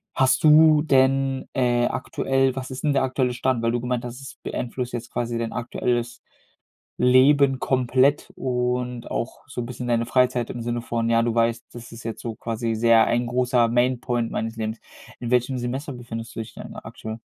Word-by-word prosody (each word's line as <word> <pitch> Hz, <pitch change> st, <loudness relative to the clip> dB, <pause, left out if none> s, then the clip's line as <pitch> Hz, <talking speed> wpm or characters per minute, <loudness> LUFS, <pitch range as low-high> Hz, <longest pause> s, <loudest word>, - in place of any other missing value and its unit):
Hast 130 Hz, +1 st, +3 dB
du 155 Hz, 0 st, +7 dB
denn, 135 Hz, -2 st, +2 dB
äh, 120 Hz, -2 st, +2 dB
aktuell 135 Hz, -1 st, 0 dB
was 130 Hz, 0 st, -5 dB
ist 130 Hz, -, -7 dB
denn 150 Hz, -2 st, +2 dB
der 135 Hz, -1 st, +2 dB
aktuelle 130 Hz, -1 st, 0 dB
Stand, 125 Hz, -1 st, 0 dB
weil 115 Hz, -, +2 dB
du 120 Hz, -, -1 dB
gemeint 125 Hz, -1 st, -2 dB
hast, 120 Hz, +1 st, -7 dB
es 135 Hz, -, -10 dB
beeinflusst 125 Hz, 0 st, -4 dB
jetzt 120 Hz, 0 st, -5 dB
quasi 120 Hz, -1 st, -2 dB
dein 115 Hz, -1 st, -3 dB
aktuelles 120 Hz, 0 st, -2 dB, 0.8 s
Leben 135 Hz, +2 st, +5 dB
komplett 130 Hz, +2 st, +2 dB
und 125 Hz, -1 st, -2 dB
auch -, -, -4 dB
so 120 Hz, -, -4 dB
'n -, -, -5 dB
bisschen 125 Hz, 0 st, -6 dB
deine 115 Hz, -1 st, +2 dB
Freizeit 125 Hz, -1 st, +1 dB
im 120 Hz, -, -5 dB
Sinne 120 Hz, 0 st, -2 dB
von, 115 Hz, 0 st, -2 dB
ja, 115 Hz, 0 st, +4 dB
du 115 Hz, 0 st, 0 dB
weißt: 115 Hz, 0 st, +1 dB
„Das 120 Hz, 0 st, -10 dB
ist 115 Hz, -, -10 dB
jetzt 115 Hz, -1 st, -5 dB
so 115 Hz, -2 st, -4 dB
quasi 115 Hz, 0 st, -3 dB
sehr 115 Hz, 0 st, +5 dB
ein 120 Hz, +1 st, +1 dB
großer 125 Hz, 0 st, +2 dB
Main 125 Hz, +2 st, +2 dB
Point 120 Hz, -2 st, -1 dB
meines 115 Hz, 0 st, -3 dB
Lebens." 110 Hz, 0 st, -3 dB, 0.4 s
In 120 Hz, -, -4 dB
welchem 125 Hz, +1 st, +2 dB
Semester 130 Hz, +4 st, -4 dB
befindest 115 Hz, -2 st, -7 dB
du -, -, -3 dB
dich 110 Hz, -, -8 dB
denn -, -, -9 dB
aktuell? 110 Hz, +1 st, -8 dB
120 Hz, 195 wpm, -24 LUFS, 115-130 Hz, 0.8 s, du